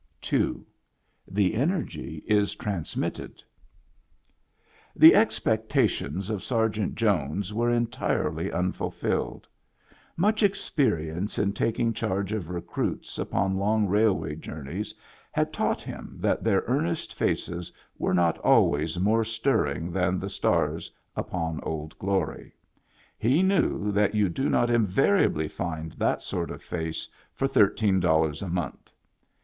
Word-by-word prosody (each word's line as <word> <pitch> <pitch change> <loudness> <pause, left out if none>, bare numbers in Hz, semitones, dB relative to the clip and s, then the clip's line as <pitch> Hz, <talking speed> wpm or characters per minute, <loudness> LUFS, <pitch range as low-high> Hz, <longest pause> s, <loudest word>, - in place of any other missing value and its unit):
II. - - +1 0.6
The 95 0 +1
Energy 130 - -2
is 105 -1 +2
TRANSMrrrED 95 -6 -4 1.5
The - - +9
expectations 95 +8 +1
of 105 -3 -3
Sergeant 110 -4 0
Jones 100 -2 0
were 120 +2 +1
en 120 0 +2
tirely 90 -8 -1
unfulfilled. 90 +1 -2 0.7
Much 210 +5 +2
experience 105 - 0
in 100 -1 +1
tiaking 115 +2 0
charge 100 0 -2
of 95 -7 -3
recruits 90 -1 -3
upon 95 0 0
long 105 +2 +2
railway 95 -7 +2
jpumeys 80 +5 -6 0.4
had - - 0
taught - - 0
him - - -8
that - - 0
their - - +2
earnest 85 +1 -1
faces 85 0 -2 0.3
were - - +1
not 85 -2 +2
always 80 +4 +3
more 110 +4 +3
stirring 110 - 0
than 90 0 +1
the 95 - -4
stars - - 0 0.2
upon 80 -3 -3
Old 80 -1 -5
Glory; 100 0 -2 0.6
he 135 - +3
knew 190 - +2
that 105 +1 +2
you 105 -3 +3
do 135 +11 -1
not 120 0 +2
invariably 115 - +3
find 80 -1 -4
that - - -1
sort - - -3
of - - -8
face 80 -2 -4 0.3
for 135 - +1
thirteen 100 -4 +3
dollars 80 -4 +2
a 100 - -4
month. 85 -4 -4
95 Hz, 120 wpm, -27 LUFS, 85-110 Hz, 1.5 s, The